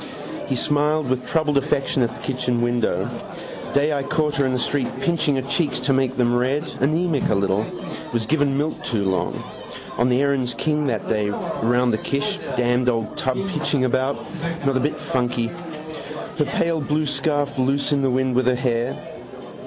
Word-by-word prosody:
He 135 - 0
smiled 150 +1 +2
with 125 -1 -1
troubled 155 -3 +2
affection 135 -1 0
at 120 - +2
the - - -10
kitchen 125 -2 -1
window. 120 -1 +1 0.6
Day 145 +2 +2
I 140 - 0
caught 150 +1 0
her 140 -2 +3
in - - 0
the 130 - +1
street 130 +1 0
pinching 155 -1 +1
her 130 - 0
cheeks 145 +2 0
to 135 - +2
make 130 -1 +1
them 120 -1 +3
red. 130 +5 +1 0.2
Anemic 155 +2 +1
a 105 - +3
little. 100 +2 +1 0.4
Was 115 -2 0
given 145 0 +2
milk 150 +2 -1
too 105 -4 0
long. 90 -2 -1 0.6
On 120 +2 +4
the 125 +2 +3
Erin's 130 -4 +1
King 150 +3 0
that 115 -6 -1
day 105 -2 +1
round 120 +3 +1
the 110 - +1
Kish. 200 +9 -1 0.2
Damned 125 +1 +3
old 115 -3 -1
tub 130 -1 0
pitching 150 -6 0
about. 130 +2 0 0.4
Not 135 -1 +2
a - - +3
bit 145 +4 0
funky. 125 -5 -1 0.9
Her 150 - +4
pale 160 +3 0
blue 150 +1 0
scarf 145 -2 0
loose 135 +3 +2
in 140 -1 +3
the 135 - +2
wind 130 0 +1
with 130 0 +2
her 125 - +4
hair. 120 -2 0
130 Hz, 185 wpm, -22 LUFS, 120-145 Hz, 0.9 s, On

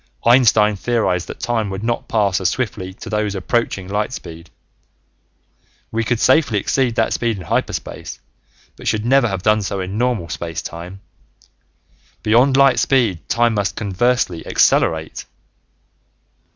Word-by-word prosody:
Einstein 110 -4 +5
theorized 95 -6 0
that - - -8
time 115 -3 -1
would 95 +2 -5
not 115 0 -2
pass 100 -4 +1
as 90 - +2
swiftly 105 -7 -3
to 100 - -12
those 105 -2 -1
approaching 95 -1 -1
light 105 +3 -2
speed. 85 -8 -9 1.4
We 115 +1 -1
could 115 0 -1
safely 130 -4 +3
exceed 125 +3 0
that 115 - +1
speed 115 -3 -1
in 95 - -8
hyperspace - - -3 0.6
but - - -9
should 105 +1 0
never 135 0 +4
have 95 -3 -4
done 105 0 +3
so 100 0 -3
in 95 +3 -4
normal 120 -9 0
space 85 0 -5
time. 90 +3 -8 1.2
Beyond 125 +5 +4
light 135 -2 +5
speed 115 -11 +1
time 120 0 +2
must 100 -2 -1
conversely 100 -3 0
accelerate! 80 -1 +1
105 Hz, 140 wpm, -19 LUFS, 95-120 Hz, 1.4 s, Einstein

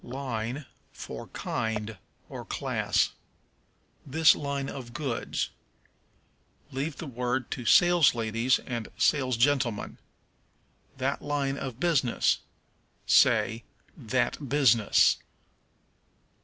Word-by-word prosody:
Line 130 +1 -4 0.3
for - - -8
Kind, 110 -1 -3 0.3
or - - -8
Class. - - 0 0.9
"This 160 +3 +5
line 140 -1 -3
of 125 -4 -8
goods." 135 -5 -3 1.2
Leave 140 +3 -3
the - - -6
word 125 -1 -3
to 125 - -4
"salesladies" 125 -8 +4
and 120 -3 -4
"salesgentlemen." 130 -3 +1 1.0
"That - - -1
line 140 -2 -1
of 130 -3 -6
business." 150 -8 +2 0.7
Say, 115 +1 +3 0.3
that 130 +2 -2
business. 120 -7 +4
130 Hz, 85 wpm, -28 LUFS, 115-140 Hz, 1.2 s, This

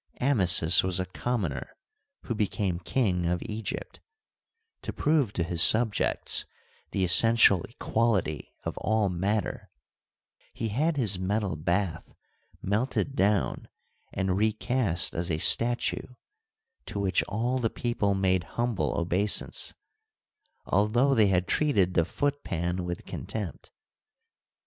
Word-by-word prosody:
Amasis 95 - +4
was 95 -1 0
a 95 - -1
commoner, 90 - -4 0.5
who 120 - -3
became 100 -4 -1
King 90 -3 0
of 90 +1 0
Egypt; 110 -1 -6 0.8
to - - -5
prove 145 -7 +1
to 85 - -1
his 85 0 0
subjects 110 +2 +3 0.5
the 95 - -1
essential 100 +1 +6
equality 110 - -1
of - - -5
all 110 -2 +1
matter, 100 +4 -2 0.8
he 115 -2 -3
had 150 +8 0
his 105 -8 0
metal 100 -1 -1
bath 85 +2 -2 0.5
melted 125 +6 -1
down 100 -1 0 0.4
and 95 -1 -1
re 110 +1 +2
cast 110 -7 0
as 85 0 -3
a 80 - 0
statue, 120 +8 +2 0.8
to 100 - -4
which 95 -1 +1
all 120 +5 -1
the 115 -2 0
people 105 -5 -1
made 95 -2 +1
humble 120 -4 -1
obeisance, 90 +5 0 0.9
although 115 +8 +2
they 110 -5 +4
had 90 -2 +1
treated 100 - +2
the 85 -2 +2
foot 145 - -2
pan 90 0 -2
with 85 -1 -5
contempt. 105 -6 -6
100 Hz, 120 wpm, -27 LUFS, 90-115 Hz, 0.9 s, essential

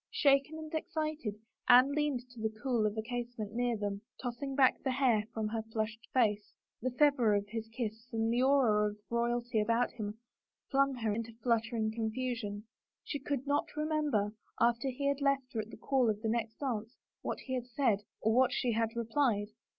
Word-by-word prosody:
Shaken 280 +2 +3
and 315 0 -8
excited, 310 -7 -2 0.3
Anne 255 +3 +8
leaned 285 -4 0
to 240 -3 -10
the 220 - +1
cool 240 -5 +2
of 210 +1 -4
a 220 - -1
case 240 +1 -4
ment 210 -1 -4
near 240 -1 0
them, 205 -1 -3 0.2
tossing 265 +2 -4
back 265 -2 +4
the 270 - -1
hair 250 -5 +3
from 220 -1 -2
her 225 0 -2
flushed 220 +1 -3
face. 210 -5 +1 0.3
The 255 - 0
fervor 250 -5 +4
of 200 0 0
his 225 +1 -4
kiss 225 0 -5
and 225 0 +1
the 245 - +2
aura 245 -6 +4
of 205 - -9
royalty 235 0 +1
about 230 +3 +2
him 215 -2 -5 0.5
flung 275 -1 +3
her 225 -4 -1
into 230 +1 -4
fluttering 230 -2 +1
confusion. 220 -2 -3 0.4
She 285 - -4
could 275 -1 -2
not 285 +1 0
remember, 300 -9 +1 0.3
after 235 +3 +3
he 280 +2 -2
had 280 0 0
left 275 -2 +1
her 225 - -1
at 215 - -10
the - - -10
call 255 +1 +2
of 215 +1 -2
the 220 - +1
next 225 -1 -1
dance, 235 -4 -3 0.2
what - - -3
he 260 - -5
had 250 -1 -2
said 235 -5 +1 0.2
or 220 - +3
what 255 +1 +4
she 245 - 0
had 225 0 0
replied. 230 -3 +1
235 Hz, 195 wpm, -33 LUFS, 220-265 Hz, 0.5 s, Anne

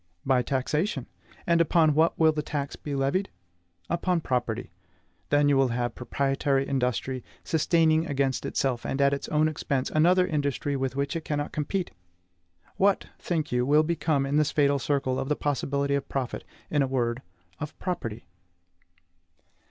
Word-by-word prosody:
By 130 -2 +3
taxation. 140 - -1 0.4
And 170 -1 +3
upon 160 -2 +4
what 160 +3 +3
will 160 -1 +5
the 155 -1 -2
tax 145 -2 -4
be 145 -2 -5
levied? 140 +9 0 0.6
Upon 170 +1 0
property. 125 - -2 0.6
Then 145 0 +4
you 145 - +4
will 135 -1 +4
have 120 0 -1
proprietary 135 +1 0
industry 130 -1 -1 0.2
sustaining 160 0 +2
against 135 -2 0
itself, 125 -3 -1
and 135 - -3
at 140 0 +4
its 140 - -4
own 155 0 +3
expense, 140 -3 -2
another 180 +4 +4
industry 145 -3 -1
with 135 -1 -2
which 140 +3 -1
it 165 - -3
cannot 145 -1 -2
compete. 175 +5 -2 0.9
What, 200 0 +2
think 160 -4 -2
you, 125 0 +2
will 150 +4 +4
become, 155 -3 0
in 140 +2 0
this 150 -1 +3
fatal 140 -1 +3
circle, 135 -1 0
of 135 - -3
the 150 - +2
possibility 140 0 -1
of 140 - -1
profit, 130 -3 -3 0.3
in 145 - +2
a 135 - +2
word, 120 -1 -1 0.4
of 150 0 -6
property? 115 - -4
140 Hz, 160 wpm, -27 LUFS, 135-155 Hz, 0.9 s, will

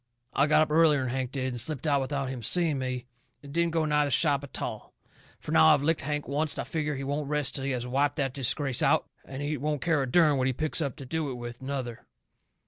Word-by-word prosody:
I 140 - +3
got 155 +1 +5
up 155 - -4
earlier'n 150 -5 +4
Hank 130 0 -2
did, 130 -2 -2
and 120 - -5
slipped 150 +5 -4
out 140 -2 +2
without 140 0 -2
him 130 -2 -5
seeing 160 - +1
me, 130 -1 -3 0.4
and 140 0 -10
didn't 170 +1 +2
go 165 -1 0
nigh 150 -1 +2
the - - -2
shop 140 +1 +3
a - - -6
tall. - - -6 0.4
Fur - - -7
now 80 0 +7
I've 140 - -3
licked 160 +1 +1
Hank 150 +1 -2
oncet 150 +2 -1
I - - -2
figger 150 -2 -2
he 135 - -5
won't 145 +1 -3
rest 150 -2 0
till 135 - -3
he - - -1
has 125 -2 -2
wiped 140 +3 +1
that 135 -4 -1
disgrace 135 0 +1
out, - - +3 0.2
and 135 +1 -6
he 150 +1 -2
won't 150 +1 -2
care 160 -4 +2
a 130 - -2
dern 155 -3 +4
what 130 - +1
he 130 - +1
picks 155 +5 -2
up 140 -5 -2
to 135 - -9
do 155 +2 -2
it 130 - -4
with, 120 0 -8
nuther. 130 -4 -5
140 Hz, 255 wpm, -28 LUFS, 130-150 Hz, 0.4 s, now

